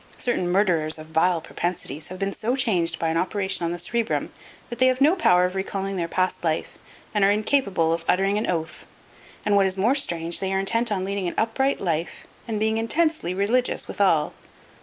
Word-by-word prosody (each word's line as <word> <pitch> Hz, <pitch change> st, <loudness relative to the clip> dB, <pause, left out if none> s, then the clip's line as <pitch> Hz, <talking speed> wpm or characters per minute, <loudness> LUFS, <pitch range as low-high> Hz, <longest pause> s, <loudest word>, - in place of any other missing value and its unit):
Certain 185 Hz, -8 st, 0 dB
murderers 170 Hz, -5 st, +2 dB
of 155 Hz, 0 st, -11 dB
vile 170 Hz, +2 st, +3 dB
propensities 160 Hz, -3 st, -4 dB
have 185 Hz, -, -8 dB
been 195 Hz, +1 st, -2 dB
so 240 Hz, +4 st, -1 dB
changed 175 Hz, -10 st, +1 dB
by 165 Hz, -, -1 dB
an 165 Hz, -, 0 dB
operation 190 Hz, 0 st, 0 dB
on 170 Hz, -, -1 dB
the 175 Hz, -, -3 dB
cerebrum 230 Hz, +6 st, -2 dB, 0.4 s
that 240 Hz, -, -7 dB
they 255 Hz, -, +5 dB
have 255 Hz, 0 st, +1 dB
no 300 Hz, +6 st, +5 dB
power 180 Hz, -, +4 dB
of 180 Hz, -, -2 dB
recalling 195 Hz, 0 st, -3 dB
their 170 Hz, -2 st, -2 dB
past 185 Hz, +2 st, -1 dB
life 160 Hz, -2 st, -2 dB, 0.3 s
and 210 Hz, -2 st, +2 dB
are 195 Hz, -, +5 dB
incapable 205 Hz, -6 st, +1 dB
of 165 Hz, 0 st, -3 dB
uttering 195 Hz, +2 st, +2 dB
an 215 Hz, -, -2 dB
oath. 160 Hz, -3 st, -3 dB, 0.6 s
And 210 Hz, -, +2 dB
what 195 Hz, -1 st, +4 dB
is 190 Hz, 0 st, -2 dB
more 220 Hz, +7 st, +3 dB
strange, 170 Hz, -, 0 dB
they 190 Hz, -1 st, -2 dB
are 190 Hz, -, +1 dB
intent 230 Hz, +4 st, 0 dB
on 190 Hz, -2 st, -1 dB
leading 200 Hz, -1 st, -2 dB
an -, -, -4 dB
upright 265 Hz, +5 st, 0 dB
life 165 Hz, -2 st, -3 dB, 0.2 s
and 220 Hz, -2 st, -2 dB
being 220 Hz, +1 st, +1 dB
intensely 305 Hz, -, 0 dB
religious 230 Hz, +6 st, +1 dB
withal. 165 Hz, -7 st, +1 dB
195 Hz, 200 wpm, -24 LUFS, 170-220 Hz, 0.6 s, they